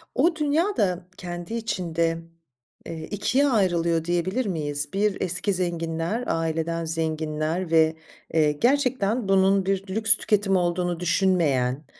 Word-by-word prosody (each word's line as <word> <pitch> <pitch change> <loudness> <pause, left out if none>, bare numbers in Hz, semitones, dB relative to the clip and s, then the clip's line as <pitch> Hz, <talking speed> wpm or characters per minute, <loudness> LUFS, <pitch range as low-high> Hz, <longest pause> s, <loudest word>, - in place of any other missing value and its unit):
O 325 +5 +3
dünya 320 +6 0
da 180 -3 0
kendi 175 +3 -6
içinde, 170 -7 -1 0.7
eee, 160 -1 -6
2 260 +7 +1
ayrılıyor 170 - +1
diyebilir 180 +8 -1
miyiz? 145 -6 -3
1 200 0 0
eski 185 +3 -1
zenginler, 170 +3 -2
aileden 165 +1 -1
zenginler 160 +1 -2
ve, 160 -1 +4 0.4
eee, 155 -2 +3
gerçekten 240 - +1
bunun 195 0 +3
bir 195 0 -2
lüks 220 -1 +5
tüketimi 205 -3 +1
olduğunu 175 -1 -1
düşünmeyen, 160 -7 +1
175 Hz, 120 wpm, -24 LUFS, 165-205 Hz, 0.7 s, lüks